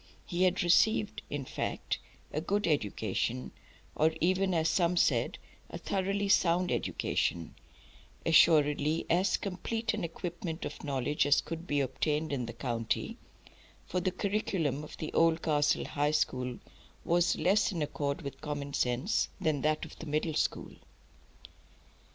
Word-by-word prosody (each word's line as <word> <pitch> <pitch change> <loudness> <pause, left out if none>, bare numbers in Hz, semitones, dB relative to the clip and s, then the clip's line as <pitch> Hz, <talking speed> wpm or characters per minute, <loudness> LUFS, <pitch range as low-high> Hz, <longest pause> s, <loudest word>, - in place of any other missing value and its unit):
He 180 +1 +1
had 185 +1 +2
received, 210 +4 +3
in 145 -2 -3
fact, - - -3 0.3
"a 150 - -1
good 205 +5 0
education" 105 - -1 0.4
or 155 +1 +3
even, 185 +2 +2
as 165 -2 +2
some 170 +1 +2
said, - - +2 0.3
"a - - -6
thoroughly 200 +1 -1
sound 180 -2 +3
education;" 85 -2 -1 0.7
assuredly 155 -1 +4
as 180 +2 +3
complete 225 +4 -2
an 215 -3 -3
equipment 170 0 -5
of 145 - -7
knowledge 145 +1 0
as 145 - +5
could 165 +1 -6
be 145 -1 +1
obtained 150 +3 -1
in 125 -4 -2
the 115 - -6
county, 115 -2 -2 0.7
for 180 - -1
the 185 +1 0
curriculum 180 - -1
of 150 - -10
the 155 - -5
Oldcastle 160 -3 +2
High 145 0 0
School 125 -5 0 0.5
was 175 +1 +3
less 190 +8 +2
in 165 -5 -1
accord 140 -1 -3
with 140 - -7
common 145 -2 -4
sense 125 - +1
than 150 -3 0
that 155 +1 +1
of - - -13
the 165 - -7
Middle 155 +2 0
School. - - -1
160 Hz, 140 wpm, -31 LUFS, 145-180 Hz, 0.7 s, as